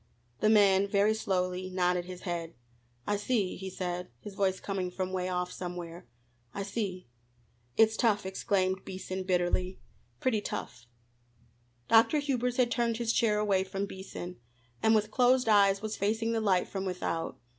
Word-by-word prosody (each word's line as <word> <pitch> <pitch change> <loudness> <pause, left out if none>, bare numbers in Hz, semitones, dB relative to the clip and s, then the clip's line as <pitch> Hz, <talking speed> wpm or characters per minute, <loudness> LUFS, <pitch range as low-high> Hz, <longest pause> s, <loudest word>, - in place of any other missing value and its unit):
The 215 - +3
man 200 -2 +5
very 200 +2 +3
slowly 185 -3 -1
nodded 180 -1 +1
his 180 0 -8
head. 170 -2 -4 0.5
"I 205 - 0
see," 205 -2 0
he 190 0 -6
said, 180 -1 -4
his 205 - -9
voice 190 -1 0
coming 190 -2 -3
from 185 +1 -4
'way 185 0 -1
off 180 0 -2
somewhere, 175 -3 -7 0.5
"I 200 - -2
see." 195 - -4 0.7
"It's 220 0 +5
tough!" 210 -4 +2
exclaimed 190 0 0
Beason 190 0 -5
bitterly 185 0 0 0.4
"pretty 255 -7 +1
tough!" 120 - -6 1.0
Dr. 230 +6 +5
Hubers 250 -4 -1
had 245 -2 +3
turned 235 -1 +1
his 230 -1 0
chair 215 -3 +2
away 200 -3 +2
from 195 +1 -3
Beason, 190 -2 -8 0.4
and 220 0 +4
with 215 0 +1
closed 250 +1 +3
eyes 200 -1 +4
was 215 0 -3
facing 225 +3 0
the 225 -1 0
light 190 -4 +2
from 195 -1 -4
without. 180 -3 -3
195 Hz, 155 wpm, -30 LUFS, 185-220 Hz, 1.0 s, man